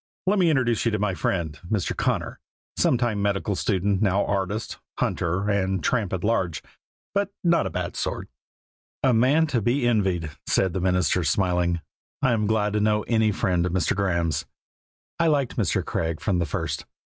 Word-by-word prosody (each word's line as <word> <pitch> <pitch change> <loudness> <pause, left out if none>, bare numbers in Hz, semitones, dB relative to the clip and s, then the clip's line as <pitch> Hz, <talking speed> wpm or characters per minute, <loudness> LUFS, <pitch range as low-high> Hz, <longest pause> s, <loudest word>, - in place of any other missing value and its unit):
Let 200 +2 +2
me 175 -2 +4
introduce 125 -7 +2 0.2
my 105 -1 0
friend, 80 -2 -2
Mr. 105 -5 -1
Connor, - - -1 0.4
sometime 120 -5 +1
medical 100 0 0
student, 100 0 0
now 100 -1 +2
artist, 100 +2 -2 0.2
hunter, 90 +4 -1
and 95 -2 0
tramp 110 -7 0
at 95 -2 -3
large, 95 -7 0 0.5
but 200 0 0
not 170 -1 +3
a - - -3
bad - - -4
sort." - - -3 0.8
"A 130 -2 +4
man 135 +8 +4
to 130 -7 0
be 120 +4 +1
envied," 95 -9 +1 0.2
said 95 -3 +2
the 95 - -2
minister, 90 -1 +2
smiling. 90 -2 +1 0.4
"I 130 - +4
am 105 -3 +1
glad 105 -1 +1
to 105 - +1
know 105 0 +2
any 110 -2 +2
friend 90 -3 0
of 90 -1 -2
Mr. 95 +1 +1
Graeme's." 85 -5 0 0.7
I 165 - +3
liked 140 -5 +1
Mr. - - 0
Craig 80 -1 -2
from 95 -4 0
the 85 - 0
first. - - -3
100 Hz, 170 wpm, -25 LUFS, 90-115 Hz, 0.8 s, me